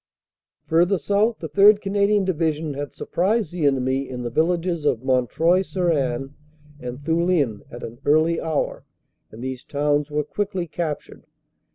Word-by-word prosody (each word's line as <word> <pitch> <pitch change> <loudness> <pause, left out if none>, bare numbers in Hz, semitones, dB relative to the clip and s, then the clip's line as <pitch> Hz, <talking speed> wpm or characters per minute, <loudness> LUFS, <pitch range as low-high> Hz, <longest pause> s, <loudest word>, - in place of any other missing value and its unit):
"Further 175 +4 +3
south 205 +7 +1
the - - -6
3rd. 205 +1 +6
Canadian 200 0 +1
Division 160 -4 -1
had 145 +1 -5
surprised 200 +1 -1
the 170 -4 +1
enemy 135 0 0
in 125 -1 -5
the 120 - -4
villages 170 +2 0
of 125 -5 +1
Montreuil 135 +8 +2
sur 180 -2 0
Haine 135 -2 -1 0.5
and 125 -2 -6
Thulin 160 - +1
at 120 - -9
an 115 +2 -8
early 160 +3 +3
hour, 160 -3 -2 0.5
and 115 +3 -10
these 130 -1 -5
towns 145 0 0
were 150 0 -1
quickly 190 +2 -3
captured. 155 -2 -5
160 Hz, 150 wpm, -23 LUFS, 135-180 Hz, 0.5 s, 3rd